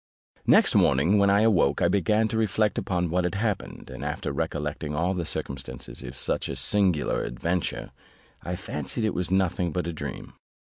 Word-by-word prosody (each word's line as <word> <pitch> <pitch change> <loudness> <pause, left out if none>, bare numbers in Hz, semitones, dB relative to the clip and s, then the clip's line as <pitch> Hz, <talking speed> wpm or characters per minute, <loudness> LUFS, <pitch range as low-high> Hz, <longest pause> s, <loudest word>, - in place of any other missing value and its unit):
Next - - +5
morning, 80 +10 +4
when 100 0 +4
I 100 +1 +4
awoke, 95 -10 +3
I 85 - +3
began 105 +4 +2
to 110 - -3
reflect 110 0 +1
upon 90 -3 -1
what 90 +1 +1
had 90 +1 -1
happened, 105 -1 -3
and - - -7
after - - -3
recollecting 75 +2 -3
all 85 +4 +1
the 90 -3 -2
circumstances 65 -4 -4
of 60 +1 -8
such - - -2
a - - -3
singular 95 -7 +2
adventure, 85 +9 -2 0.5
I 90 - -4
fancied 90 - -4
it 110 - 0
was 90 -1 -2
nothing 90 -2 +1
but 90 +2 -2
a 85 - -3
dream. 75 -4 -7
90 Hz, 180 wpm, -26 LUFS, 75-100 Hz, 0.5 s, Next